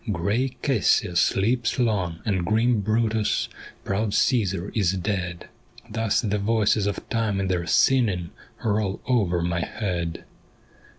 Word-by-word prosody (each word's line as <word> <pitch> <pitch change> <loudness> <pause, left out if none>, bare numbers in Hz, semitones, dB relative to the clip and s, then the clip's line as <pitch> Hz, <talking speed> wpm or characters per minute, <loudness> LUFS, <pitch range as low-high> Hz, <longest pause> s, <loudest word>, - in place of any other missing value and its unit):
' - - +2
Grey 105 +9 -1
Cassius 100 - +2
sleeps 115 +4 +1
long, 100 -9 0
and 95 -5 0
grim 110 +4 +2
Brutus, 110 +1 0 0.4
Proud 100 +1 -1
Caesar 100 -6 +1
is 100 -5 +1
dead 90 -2 -3 0.2
'; - - -20
Thus 110 -1 +1
the 105 -3 -1
voices 105 -1 +2
of 100 - -4
time 110 -4 0
in 95 -1 -1
their 85 -2 -1
singing 95 -3 +2 0.3
Roll 105 -3 0
over 95 -9 +1
my 85 0 -1
head. 85 -3 -3
100 Hz, 135 wpm, -24 LUFS, 90-115 Hz, 0.4 s, '